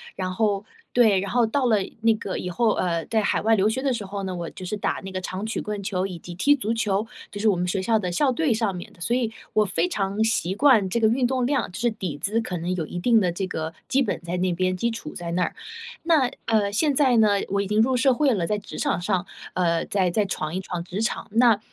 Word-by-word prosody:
然 185 Hz, -1 st, -3 dB
后 205 Hz, 0 st, 0 dB, 0.3 s
对， 220 Hz, -6 st, +4 dB
然 195 Hz, 0 st, -4 dB
后 240 Hz, -1 st, +3 dB
到 255 Hz, +3 st, +1 dB
了 220 Hz, -, +4 dB, 0.2 s
那 225 Hz, 0 st, +5 dB
个 200 Hz, -3 st, -4 dB
以 180 Hz, -, -4 dB
后， 225 Hz, +6 st, +2 dB
呃， 170 Hz, -3 st, -1 dB
在 220 Hz, -1 st, +1 dB
海 -, -, +1 dB
外 225 Hz, +1 st, +4 dB
留 205 Hz, +1 st, +3 dB
学 250 Hz, +4 st, -2 dB
的 270 Hz, -1 st, +1 dB
时 225 Hz, -4 st, -3 dB
候 200 Hz, +1 st, -5 dB
呢， 185 Hz, -1 st, -3 dB
我 170 Hz, -2 st, -4 dB
就 185 Hz, -, -9 dB
是 195 Hz, -, -2 dB
打 205 Hz, -, -1 dB
那 190 Hz, -, -6 dB
个 185 Hz, 0 st, -4 dB
长 185 Hz, +3 st, -4 dB
曲 225 Hz, -, -2 dB
棍 210 Hz, -1 st, -4 dB
球 190 Hz, -1 st, -1 dB
以 180 Hz, -3 st, -7 dB
及 175 Hz, +1 st, -9 dB
踢 285 Hz, +12 st, +4 dB
足 230 Hz, -5 st, -1 dB
球， 210 Hz, -2 st, 0 dB, 0.3 s
就 205 Hz, -, -6 dB
是 220 Hz, -, +1 dB
我 205 Hz, -, +4 dB
们 180 Hz, +1 st, -1 dB
学 190 Hz, +2 st, 0 dB
校 220 Hz, +4 st, +2 dB
的 180 Hz, -3 st, -2 dB
校 265 Hz, +9 st, +2 dB
队 300 Hz, +2 st, +1 dB
上 220 Hz, -4 st, -1 dB
面 175 Hz, -, -8 dB
的， -, -, -22 dB
所 230 Hz, +8 st, 0 dB
以 240 Hz, -3 st, 0 dB, 0.2 s
我 215 Hz, -, +4 dB
非 180 Hz, -4 st, 0 dB
常 195 Hz, +2 st, -2 dB
习 195 Hz, -5 st, 0 dB
惯 230 Hz, -5 st, +4 dB
这 235 Hz, -, 0 dB
个 220 Hz, -, +4 dB
运 245 Hz, +3 st, +2 dB
动 255 Hz, -1 st, 0 dB
量， 280 Hz, -7 st, 0 dB
就 -, -, -7 dB
是 240 Hz, +1 st, +2 dB
底 185 Hz, -9 st, -5 dB
子 215 Hz, +8 st, 0 dB
可 180 Hz, -5 st, -4 dB
能 175 Hz, +2 st, -2 dB
有 165 Hz, -4 st, -2 dB
一 -, -, -6 dB
定 225 Hz, +4 st, +4 dB
的 180 Hz, -3 st, +1 dB
这 190 Hz, +3 st, -3 dB
个 160 Hz, -3 st, -4 dB, 0.2 s
基 265 Hz, +1 st, +2 dB
本 235 Hz, -, -1 dB
在 175 Hz, +1 st, -4 dB
那 180 Hz, 0 st, +1 dB
边， 185 Hz, +1 st, 0 dB
基 235 Hz, +6 st, 0 dB
础 225 Hz, -10 st, -6 dB
在 170 Hz, -1 st, -5 dB
那 180 Hz, +1 st, +2 dB
儿。 -, -, -3 dB, 0.5 s
那， 315 Hz, -6 st, +3 dB, 0.2 s
呃， 215 Hz, -3 st, +2 dB
现 290 Hz, +8 st, +2 dB
在 260 Hz, -4 st, +4 dB
呢， 220 Hz, -1 st, +5 dB, 0.2 s
我 200 Hz, +1 st, +1 dB
已 200 Hz, -, -3 dB
经 210 Hz, +2 st, +3 dB
入 255 Hz, +3 st, +2 dB
社 260 Hz, +2 st, +4 dB
会 275 Hz, 0 st, +2 dB
了， 175 Hz, -6 st, -1 dB
在 210 Hz, -, 0 dB
职 205 Hz, -, -9 dB
场 -, -, 0 dB
上， 180 Hz, 0 st, -1 dB, 0.3 s
呃， 170 Hz, -2 st, +1 dB
再 190 Hz, -3 st, +1 dB
再 205 Hz, +4 st, +1 dB
闯 155 Hz, -5 st, -3 dB
一 -, -, -1 dB
闯 180 Hz, -2 st, -5 dB
职 185 Hz, +4 st, -4 dB
场， 220 Hz, -, -2 dB
那 230 Hz, -1 st, +4 dB
205 Hz, 295 characters per minute, -24 LUFS, 185-230 Hz, 0.5 s, 那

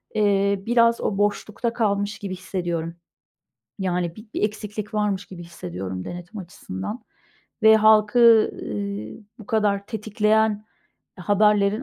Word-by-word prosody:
eee, 200 Hz, -1 st, +2 dB
biraz 235 Hz, 0 st, +3 dB
o 195 Hz, -, -1 dB
boşlukta 205 Hz, +3 st, -1 dB
kalmış 205 Hz, -2 st, -1 dB
gibi 195 Hz, -2 st, -5 dB
hissediyorum. 175 Hz, -3 st, -4 dB, 0.8 s
Yani, 180 Hz, -3 st, -2 dB
bi-bir 215 Hz, 0 st, -7 dB
eksiklik 210 Hz, 0 st, -4 dB
varmış 205 Hz, -2 st, -1 dB
gibi 180 Hz, -2 st, -10 dB
hissediyorum, 95 Hz, -, -6 dB
denetim 175 Hz, +4 st, -8 dB
açısından. 175 Hz, -, -7 dB, 0.6 s
Ve 220 Hz, 0 st, +8 dB
halkı, 220 Hz, +1 st, +5 dB
eee, 105 Hz, +1 st, -5 dB, 0.2 s
bu 220 Hz, -, -12 dB
kadar 205 Hz, -2 st, 0 dB
tetikleyen 215 Hz, 0 st, 0 dB, 0.5 s
haberlerin 205 Hz, +3 st, +2 dB
205 Hz, 110 wpm, -23 LUFS, 180-215 Hz, 0.8 s, Ve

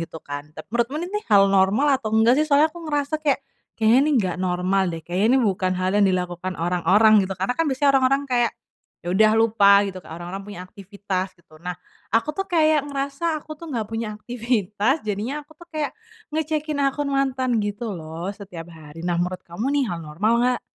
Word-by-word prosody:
gitu 160 Hz, -1 st, -7 dB
kan. 145 Hz, +1 st, -6 dB
Tapi 155 Hz, -, -8 dB
menurutmu 235 Hz, +4 st, 0 dB
ini 395 Hz, +4 st, -3 dB
hal 200 Hz, -2 st, +5 dB
normal 210 Hz, +9 st, +3 dB
atau 215 Hz, -2 st, -3 dB
enggak 230 Hz, +4 st, +5 dB
sih 305 Hz, -, +2 dB
soalnya 300 Hz, +2 st, +4 dB
aku 345 Hz, -, -10 dB
ngerasa 295 Hz, 0 st, -1 dB
kayak, 280 Hz, -3 st, +1 dB, 0.3 s
kayaknya 225 Hz, +2 st, +4 dB
ini -, -, +2 dB
nggak 185 Hz, -7 st, 0 dB
normal 185 Hz, +1 st, +1 dB
deh, 165 Hz, -1 st, -5 dB
kayaknya 180 Hz, +5 st, 0 dB
ini -, -, +4 dB
bukan 185 Hz, -3 st, 0 dB
hal 185 Hz, 0 st, 0 dB
yang 205 Hz, -, +5 dB
dilakukan 180 Hz, 0 st, -2 dB
orang-orang 180 Hz, +6 st, +3 dB
gitu, 190 Hz, -, -4 dB
karena 190 Hz, +6 st, -1 dB
kan 330 Hz, -, +2 dB
biasanya 280 Hz, +1 st, +3 dB
orang-orang 270 Hz, +2 st, +2 dB
kayak, 240 Hz, -1 st, +2 dB, 0.5 s
ya -, -, -4 dB
udah 215 Hz, +3 st, +5 dB
lupa 205 Hz, -3 st, +5 dB
gitu 185 Hz, -, -9 dB
kayak 160 Hz, -, -10 dB
orang-orang 190 Hz, +3 st, -6 dB
punya 205 Hz, -3 st, -8 dB
aktivitas 195 Hz, -1 st, -4 dB
gitu. 170 Hz, -2 st, -23 dB
Nah, 180 Hz, 0 st, -4 dB, 0.4 s
aku 230 Hz, +6 st, +2 dB
tuh 390 Hz, +5 st, -3 dB
kayak 315 Hz, -3 st, +3 dB
ngerasa 275 Hz, +2 st, -4 dB, 0.2 s
aku 310 Hz, -, -9 dB
tuh 335 Hz, -, -9 dB
nggak 235 Hz, -7 st, -2 dB
punya 225 Hz, -1 st, -3 dB
aktivitas 230 Hz, -, -1 dB
jadinya 220 Hz, +8 st, -3 dB
aku 295 Hz, -, -43 dB
tuh 345 Hz, -, -12 dB
kayak, 300 Hz, -2 st, -2 dB, 0.4 s
ngecekin 305 Hz, -1 st, -2 dB
akun 280 Hz, +1 st, -1 dB
mantan 265 Hz, -2 st, 0 dB
gitu 205 Hz, +2 st, -3 dB
loh 165 Hz, +1 st, -6 dB
setiap 185 Hz, -5 st, -9 dB
hari. 160 Hz, 0 st, -11 dB
Nah 175 Hz, -1 st, 0 dB
menurut 180 Hz, +1 st, -3 dB
kamu 175 Hz, +8 st, -5 dB
nih 280 Hz, -, +2 dB
hal 175 Hz, -, -3 dB
normal 170 Hz, +9 st, 0 dB
nggak? 250 Hz, 0 st, +1 dB
215 Hz, 200 wpm, -23 LUFS, 185-275 Hz, 0.5 s, hal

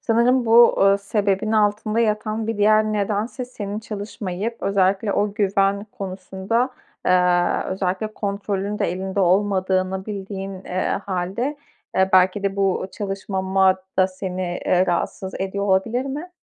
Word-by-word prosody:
Sanırım 235 Hz, +2 st, +2 dB
bu, 235 Hz, +1 st, +6 dB
ııı, 195 Hz, 0 st, +5 dB
sebebin 200 Hz, +1 st, 0 dB
altında 215 Hz, +1 st, +1 dB
yatan 215 Hz, 0 st, 0 dB
bir 225 Hz, -1 st, -2 dB
diğer 215 Hz, +1 st, +5 dB
nedense 215 Hz, +4 st, -2 dB
senin 210 Hz, -4 st, -6 dB
çalışmayıp 210 Hz, 0 st, -5 dB
özellikle 195 Hz, +1 st, +1 dB
o 205 Hz, 0 st, 0 dB
güven 200 Hz, -1 st, +1 dB
konusunda, 195 Hz, +5 st, -2 dB, 0.4 s
eee, 180 Hz, -1 st, +3 dB
özellikle 190 Hz, +3 st, -2 dB
kontrolün 200 Hz, 0 st, -3 dB
de -, -, +1 dB
elinde 190 Hz, +2 st, -3 dB
olmadığını 190 Hz, 0 st, +1 dB
bildiğin, 195 Hz, -1 st, -5 dB
eee, 185 Hz, +2 st, -1 dB
hâlde, 195 Hz, +10 st, -2 dB, 0.4 s
eee, 190 Hz, 0 st, +4 dB
belki 185 Hz, +2 st, +4 dB
de 200 Hz, 0 st, -1 dB
bu 195 Hz, -1 st, +1 dB
çalışmamak 190 Hz, -1 st, 0 dB, 0.2 s
da 185 Hz, -, +6 dB
seni, 185 Hz, 0 st, -5 dB, 0.2 s
eee, 185 Hz, +1 st, +3 dB
rahatsız 190 Hz, +1 st, -2 dB
ediyor 195 Hz, +1 st, -2 dB
olabilir 205 Hz, +6 st, +1 dB
mi? 295 Hz, +6 st, -5 dB
200 Hz, 130 wpm, -22 LUFS, 190-215 Hz, 0.4 s, bu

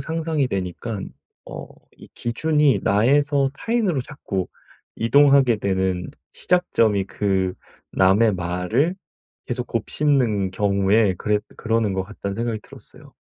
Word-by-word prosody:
상상이 160 Hz, -4 st, -1 dB
되니깐 95 Hz, +2 st, -4 dB, 0.4 s
어 -, -, -8 dB, 0.3 s
이 -, -, -15 dB
기준이 150 Hz, +4 st, +1 dB
나에서 140 Hz, +6 st, +2 dB
타인으로 210 Hz, -, 0 dB
자꾸 100 Hz, -9 st, -5 dB, 0.5 s
이동하게 135 Hz, 0 st, +4 dB
되는 95 Hz, -3 st, -1 dB, 0.2 s
시작점이 115 Hz, -, +1 dB
그 95 Hz, -2 st, -1 dB, 0.4 s
'남의 100 Hz, +3 st, +4 dB
말을 90 Hz, -, -1 dB, 0.5 s
계속 120 Hz, 0 st, -3 dB
곱씹는 115 Hz, -4 st, 0 dB
경우에 100 Hz, 0 st, +2 dB
그래 105 Hz, -1 st, +1 dB, 0.2 s
그러는 115 Hz, -2 st, 0 dB
것 95 Hz, -, -1 dB
같다.'는 100 Hz, +1 st, -6 dB
생각이 115 Hz, 0 st, -3 dB
들었어요. -, -, -14 dB
115 Hz, 265 characters per minute, -22 LUFS, 95-140 Hz, 0.5 s, 이동하게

